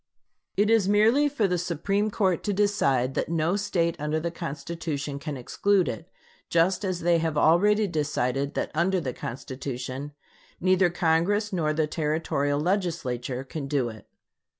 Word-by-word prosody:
It 210 +2 +3
is 215 -4 +3
merely 225 +8 +4
for 235 -8 +1
the 180 -1 0
Supreme 195 +5 0
Court 190 -4 +1
to 205 - 0
decide 140 -11 +1
that - - -2
no 165 +2 +1
State 180 -5 0
under 150 +1 -1
the 170 +1 -3
Constitution 145 -1 -4
can 145 -1 -5
exclude 185 +8 +1
it, 110 - -5 0.4
just 175 +4 +2
as 185 -2 -2
they 170 0 +3
have 160 -2 -1
already 205 +8 +4
decided 145 -5 -1
that - - -2
under 180 +4 +2
the 130 -7 -3
Constitution 130 +3 -6 0.5
neither 185 0 +3
Congress 175 +5 +1
nor 160 -4 +1
the 155 0 +1
Territorial 150 -2 -1
Legislature 150 - -1
can 140 +1 -6
do 135 -4 0
it. 110 -1 -12
165 Hz, 150 wpm, -26 LUFS, 145-190 Hz, 0.5 s, merely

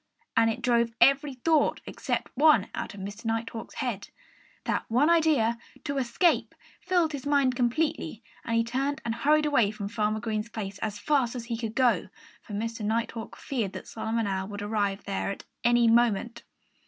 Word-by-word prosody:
And 225 0 +5
it 225 - -3
drove 235 -2 +2
every 275 +2 +4
thought 305 +4 +2
except - - -3
one 280 -7 +5
out 210 - -5
of - - -10
Mr. 200 +3 -7
Nighthawk's 225 0 -3
head. 240 -8 -3 0.5
That - - -1
one 270 +8 +4
idea 290 -9 +3 0.2
to 280 -1 -2
escape 270 +8 +1 0.2
filled 355 -4 +1
his 285 -2 -5
mind 280 -3 +3
completely. 245 - -1 0.2
And 230 0 0
he 230 - +3
turned 270 +4 -1
and 230 - 0
hurried 300 +6 +3
away 260 -9 +3
from 205 -1 -5
Farmer 215 -1 0
Green's 220 -1 -3
place 200 -3 -6
as 210 -2 -3
fast 260 +1 +1
as 240 -2 -5
he 235 -1 -3
could 225 -1 -4
go; 250 -2 +2 0.3
for 210 - -11
Mr. 225 +2 -3
Nighthawk 225 +1 -2
feared 230 -8 -3
that - - -8
Solomon 225 0 -2
Owl 190 -1 -2
would 205 0 -6
arrive 205 -2 -1
there 200 0 -2
at 200 - -5 0.2
any 240 0 +4
moment. 235 0 +2
230 Hz, 180 wpm, -28 LUFS, 215-270 Hz, 0.5 s, And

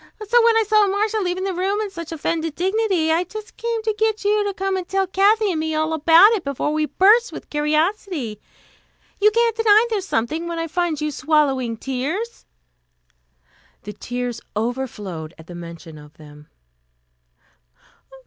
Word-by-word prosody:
So 475 +2 +4
when 460 -1 +4
I 450 - +4
saw 425 -1 +4
Marcia 420 +3 0
leaving 365 -1 -2
the 385 -1 -2
room 385 +3 -1
in 425 -2 -3
such 335 -3 -8
offended 325 0 -2
dignity, 380 -3 +1
I 330 +2 +2
just 430 +4 -10
came 460 -1 -3
to 435 0 0
get 440 -1 -1
you 415 0 +2
to 405 - -1
come 390 0 -2
and 370 -2 -4
tell 385 0 0
Kathy 405 +3 +2
and 325 - -2
me 315 0 -2
all 315 +1 0
about 330 +6 +6
it 425 -6 0
before 280 +2 -2
we 310 0 0
burst 420 - +4
with - - -10
curiosity. 305 - -1 0.8
You 415 +1 +5
can't 460 +1 +1
deny 445 0 +5
there's 400 -3 -2
something, 310 +9 -1
when 340 -1 -4
I 330 - -2
find 330 -2 -1
you 305 0 -2
swallowing 275 -6 +1
tears 290 - -4 0.6
" - - -38
The 210 - -7
tears 245 0 -5 0.2
overflowed 210 -9 -4
at 160 - -14
the 175 - -11
mention 170 -2 -10
of 150 +1 -16
them. 150 -1 -15
335 Hz, 175 wpm, -21 LUFS, 265-415 Hz, 0.8 s, about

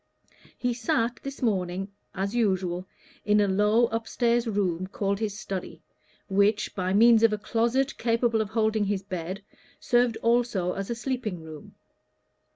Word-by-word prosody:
He 245 -1 0
sat 230 0 0
this 275 -1 -7
morning, 195 -3 -1 0.2
as 195 +2 -2
usual, 185 -5 0 0.4
in 210 0 +3
a 205 - +3
low 210 +4 +3
up 225 0 -3
stairs 240 0 +1
room, 185 -4 -1
called 200 0 -2
his 210 -2 -3
study, 190 -3 -6 0.4
which, 205 +2 +2
by 185 -1 -2
means 225 +3 +6
of 225 -1 +5
a - - 0
closet 235 +6 0
capable 230 -1 +1
of 215 - -3
holding 220 -1 +1
his 200 -1 -1
bed, 185 0 -5 0.4
served 240 -2 +2
also 230 -6 +1
as 195 0 -5
a 235 - -1
sleeping 235 -8 -3
room. 155 -2 -11
210 Hz, 155 wpm, -27 LUFS, 195-235 Hz, 0.4 s, means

